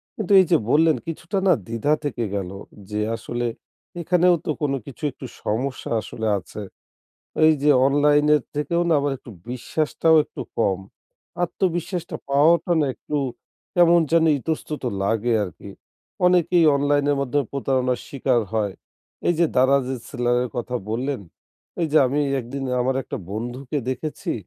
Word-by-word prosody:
কিন্তু 210 -6 -4
এই 185 - +5
যে, 165 - +6
বললেন 160 +1 +4
কিছুটা 170 +4 -4
না 180 - +7
দ্বিধা 115 +6 0
থেকে 125 -5 -2
গেল। 95 -2 -3 0.4
যে, 105 0 -2 0.2
আসলে 120 +2 -4 0.6
এখানেও 180 +1 +4
তো - - 0
কোনো 140 -2 0
কিছু 140 +3 -12
একটু 130 - -10 0.2
সমস্যা 130 +6 -2
আসলে 110 +1 -5
আছে। 105 - -9 0.9
এই 160 - +7
যে, 150 - +5 0.2
অনলাইনের 145 0 +4
থেকেও 170 +4 0
না 165 - +4
আমার 140 0 0
একটু 120 - -13 0.2
বিশ্বাসটাও 155 +5 +1
একটু - - -10 0.2
কম। 100 -5 +2 0.7
আত্মবিশ্বাসটা 175 0 -2
পাওয়াটা 165 +5 +4
না 145 - +2
একটু 150 - -5 0.6
কেমন 175 -1 +6
যেন 165 -1 +5
ইতস্তত 155 +1 -4 0.2
লাগে 115 +4 +1
আরকি। 90 - -10 0.6
অনেকেই 180 -1 +4
অনলাইনের 145 0 +2
মাধ্যম 140 +1 0
প্রতারণার 130 -2 0
শিকার 130 -3 +1
হয়। 105 -3 0 0.6
এই 175 - +3
যে, 170 - +4
Daraz 135 +1 +4
এ - - -4
সেলারের 125 -1 0
কথা 125 +1 -2
বললেন। 130 +3 -2 0.6
এই 165 - +2
যে, - - +3
আমি 140 +4 0 0.2
একদিন 135 +3 -6 0.2
আমার 130 +1 +1
একটা - - -6
বন্ধুকে 120 +6 -4
দেখেছি। 140 +4 -4
140 Hz, 145 wpm, -23 LUFS, 125-160 Hz, 0.9 s, না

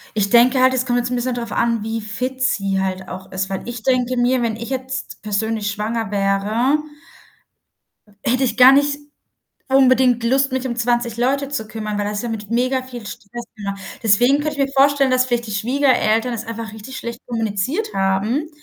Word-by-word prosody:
Ich 200 -2 +1
denke 245 +3 +5
halt, 260 0 +5
es 255 0 0
kommt 245 -1 +1
jetzt 240 - -2
'n 250 - -1
bisschen 245 0 -1
drauf 235 -2 -5
an, 230 -2 +1
wie 225 0 -3
fit 250 +6 -4
sie 195 -7 +1
halt 190 0 -3
auch 185 +1 -9
ist. 190 +1 -3
Weil 190 - -3
ich 240 -1 -6
denke 255 -1 +1
mir, 245 +1 +2
wenn 225 -2 -1
ich 235 +2 -7
jetzt 260 0 -5
persönlich 215 0 -1
schwanger 220 +1 -3
wäre 210 +8 +1 1.4
hätte 255 +3 +1
ich 235 -4 0
gar 255 +1 +9
nicht 285 +1 +2 0.7
unbedingt 255 -2 +4
Lust, 270 +3 +2
mich 260 0 -1
um 240 -2 -3
20 240 -1 0
Leute 270 +3 0
zu 275 -6 -4
kümmern, 215 -1 -4
weil 205 - -1
das 205 0 -2
ist - - -3
ja 240 - -3
mit 215 -2 -5
mega 255 +2 +1
viel 245 -3 -9
Stress 240 +5 -8
immer. 200 -1 -4 0.3
Deswegen 245 +6 +4
könnte 300 -1 -3
ich 275 - +3
mir 275 - -11
vorstellen, 275 -1 +4
dass 255 0 +3
vielleicht 240 -1 -1
die - - -7
Schwiegereltern 245 0 +1
es 225 0 -5
einfach 230 -1 -6
richtig 220 +5 -9
schlecht 235 +1 -6
kommuniziert 230 - -2
haben, 195 +10 0
240 Hz, 200 wpm, -20 LUFS, 215-260 Hz, 1.4 s, gar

